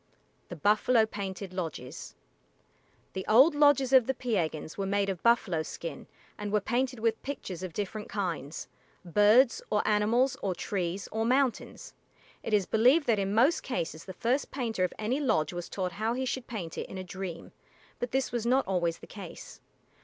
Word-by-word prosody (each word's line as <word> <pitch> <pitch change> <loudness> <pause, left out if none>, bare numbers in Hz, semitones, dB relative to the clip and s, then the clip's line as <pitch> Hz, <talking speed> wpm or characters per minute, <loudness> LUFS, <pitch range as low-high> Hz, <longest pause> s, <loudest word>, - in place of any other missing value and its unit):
THE 175 - -6
BUFFALO 215 - +3
PAINTED 195 -3 -6
LODGES 160 -5 -6 1.0
The 190 - -3
old 260 +9 +7
lodges 290 -3 +4
of 255 -3 +6
the 265 - 0
Piegans 170 -11 -2
were 195 -1 -2
made 200 0 +1
of 185 -3 -3
buffalo 225 -8 +3
skin 160 -1 -7 0.3
and 205 -1 -4
were 210 - +3
painted 250 +4 -1
with 225 0 0
pictures 200 -10 -6
of 185 -2 -5
different 210 +3 -4
kinds 170 -7 -3 0.4
birds, 210 +8 +5
or 210 - +1
animals, 230 +5 +3
or 190 -2 -1
trees, 185 0 -3
or 220 0 -1
mountains. 255 +1 0 0.5
It - - -5
is 205 -3 +3
believed 255 - +4
that 225 -3 +2
in 195 +1 -1
most 265 +9 +4
cases 165 -10 -4
the 190 - -7
first 245 +8 0
painter 230 -8 -2
of 180 - +1
any 230 +6 -1
lodge 170 - +1
was 175 0 -5
taught 185 -2 -2
how 220 +4 -1
he 260 +1 -2
should 255 0 -3
paint 180 -8 -5
it - - -5
in 190 - -7
a 185 - -4
dream, 185 -2 -7 0.5
but 245 - -2
this 265 +2 0
was 240 -2 -2
not 255 +3 +2
always 175 -3 0
the - - -12
case. 195 -5 -10
210 Hz, 180 wpm, -29 LUFS, 185-245 Hz, 1.0 s, old